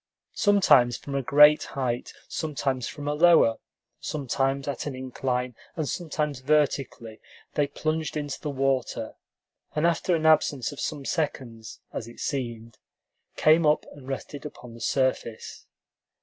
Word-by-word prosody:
Sometimes 165 Hz, -, +4 dB
from 140 Hz, -, -8 dB
a 140 Hz, -, 0 dB
great 150 Hz, +3 st, +6 dB, 0.2 s
height, 125 Hz, -2 st, -2 dB, 0.2 s
sometimes 135 Hz, -5 st, -2 dB
from 145 Hz, -1 st, -7 dB
a 145 Hz, -, +1 dB
lower, 160 Hz, -7 st, +5 dB, 0.4 s
sometimes 135 Hz, -1 st, -1 dB
at 140 Hz, +1 st, -3 dB
an 140 Hz, -, -4 dB
incline, 125 Hz, -1 st, -3 dB, 0.2 s
and 155 Hz, -3 st, -2 dB
sometimes 150 Hz, -5 st, -2 dB
vertically, 135 Hz, -5 st, 0 dB, 0.3 s
they 145 Hz, -1 st, +1 dB
plunged 155 Hz, +2 st, -2 dB
into 145 Hz, -2 st, -4 dB
the 150 Hz, -, -3 dB
water, 135 Hz, -4 st, -1 dB, 0.6 s
and 155 Hz, +2 st, +1 dB
after 170 Hz, +1 st, +2 dB
an 160 Hz, -1 st, -2 dB
absence 150 Hz, -5 st, +3 dB
of 145 Hz, -, -10 dB
some 145 Hz, -3 st, -4 dB
seconds, 130 Hz, -9 st, -4 dB
as 115 Hz, -, -5 dB
it 120 Hz, -, -13 dB
seemed, 115 Hz, -4 st, -4 dB, 0.6 s
came 160 Hz, +2 st, +5 dB
up 150 Hz, 0 st, +3 dB
and 135 Hz, -3 st, -13 dB
rested 135 Hz, +1 st, -6 dB
upon 125 Hz, -5 st, -10 dB
the 115 Hz, -, -12 dB
surface. 130 Hz, -5 st, -2 dB
140 Hz, 140 wpm, -26 LUFS, 125-150 Hz, 0.6 s, great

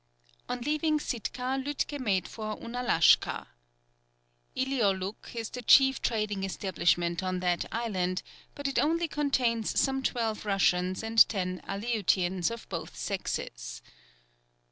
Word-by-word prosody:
On 250 Hz, -, -2 dB
leaving 305 Hz, +3 st, +1 dB
Sitka, 255 Hz, +1 st, -3 dB
Lütke 290 Hz, +1 st, -2 dB
made 195 Hz, -8 st, 0 dB
for 215 Hz, -1 st, -5 dB
Ounalashka. 240 Hz, -8 st, +2 dB, 1.1 s
Ilioluk 215 Hz, -7 st, -1 dB
is 225 Hz, -2 st, -4 dB
the 250 Hz, -, -6 dB
chief 265 Hz, +2 st, +6 dB
trading 210 Hz, -4 st, -1 dB
establishment 175 Hz, -2 st, 0 dB
on 185 Hz, -1 st, -2 dB
that 180 Hz, -1 st, 0 dB
island, 185 Hz, -6 st, -1 dB, 0.3 s
but 285 Hz, 0 st, -3 dB
it 275 Hz, -, 0 dB
only 335 Hz, +2 st, +2 dB
contains 255 Hz, -7 st, 0 dB
some 270 Hz, -1 st, +1 dB
twelve 230 Hz, -4 st, -1 dB
Russians 185 Hz, -2 st, +1 dB
and 225 Hz, 0 st, +6 dB
ten 185 Hz, -3 st, -2 dB
Aleutians 195 Hz, -4 st, 0 dB
of 230 Hz, -1 st, -7 dB
both -, -, -6 dB
sexes. -, -, -4 dB
220 Hz, 120 wpm, -29 LUFS, 185-255 Hz, 1.1 s, chief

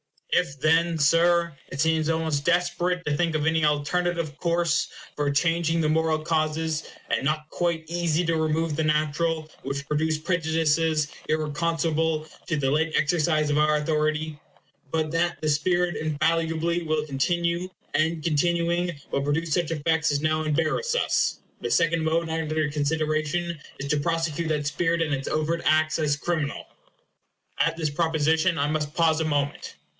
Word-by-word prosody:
If 140 Hz, -6 st, +1 dB
then, 165 Hz, +1 st, +3 dB
Sir, 170 Hz, +2 st, +3 dB, 0.2 s
it 135 Hz, -, -2 dB
seems 160 Hz, 0 st, +2 dB
almost 160 Hz, -3 st, 0 dB
desperate 175 Hz, +1 st, +1 dB
to 150 Hz, -, 0 dB
think 165 Hz, 0 st, 0 dB
of 150 Hz, -1 st, 0 dB
any 160 Hz, 0 st, +2 dB
alterative 155 Hz, +1 st, 0 dB
course 170 Hz, -1 st, +1 dB, 0.3 s
for 145 Hz, -1 st, 0 dB
changing 165 Hz, +3 st, +1 dB
the 155 Hz, -, +1 dB
moral 160 Hz, 0 st, +2 dB
causes, 155 Hz, 0 st, -1 dB, 0.2 s
and -, -, 0 dB
not 155 Hz, +1 st, -1 dB
quite 170 Hz, -2 st, -1 dB
easy 170 Hz, 0 st, 0 dB
to 165 Hz, 0 st, +1 dB
remove 160 Hz, 0 st, 0 dB
the 160 Hz, -, 0 dB
natural, 155 Hz, +1 st, 0 dB
which 140 Hz, 0 st, -4 dB
produce 155 Hz, +1 st, 0 dB
prejudices 160 Hz, -2 st, +1 dB, 0.2 s
irreconcilable 160 Hz, 0 st, 0 dB, 0.2 s
to 160 Hz, -, 0 dB
the 135 Hz, -3 st, 0 dB
late 155 Hz, +2 st, +1 dB
exercise 155 Hz, -1 st, +2 dB
of 145 Hz, -, +1 dB
our 150 Hz, 0 st, +3 dB
authority 155 Hz, 0 st, -1 dB, 0.5 s
but 155 Hz, 0 st, -1 dB
that 170 Hz, +1 st, 0 dB
the 155 Hz, -, 0 dB
spirit 175 Hz, +4 st, +1 dB
infallibly 165 Hz, +2 st, 0 dB
will 155 Hz, -2 st, -1 dB
continue, 170 Hz, +5 st, 0 dB, 0.3 s
and, 160 Hz, 0 st, +1 dB
continuing, 170 Hz, +1 st, 0 dB
will -, -, 0 dB
produce 150 Hz, +3 st, -1 dB
such 175 Hz, -1 st, +1 dB
effects 160 Hz, 0 st, +1 dB
as 145 Hz, 0 st, 0 dB
now 155 Hz, 0 st, +1 dB
embarrass 160 Hz, -, 0 dB
us -, -, +1 dB, 0.2 s
the -, -, -3 dB
second 165 Hz, -1 st, +2 dB
mode 165 Hz, +1 st, +1 dB
under 155 Hz, -1 st, -1 dB
consideration 155 Hz, +3 st, -1 dB, 0.2 s
is 140 Hz, -, -4 dB
to 150 Hz, -, +2 dB
prosecute 165 Hz, +1 st, -1 dB
that 150 Hz, -2 st, -1 dB
spirit 165 Hz, +3 st, 0 dB
in 155 Hz, -3 st, 0 dB
its 135 Hz, 0 st, -3 dB
overt 155 Hz, +2 st, 0 dB
acts 155 Hz, +1 st, +3 dB
as 150 Hz, -2 st, +2 dB
criminal. 155 Hz, -1 st, -2 dB, 0.9 s
At 165 Hz, 0 st, +2 dB
this 160 Hz, -2 st, 0 dB
proposition 160 Hz, +2 st, +1 dB
I 145 Hz, -1 st, +1 dB
must 150 Hz, 0 st, -2 dB
pause 165 Hz, -2 st, +3 dB
a 160 Hz, -, 0 dB
moment. 145 Hz, -2 st, -2 dB
160 Hz, 155 wpm, -25 LUFS, 150-170 Hz, 0.9 s, then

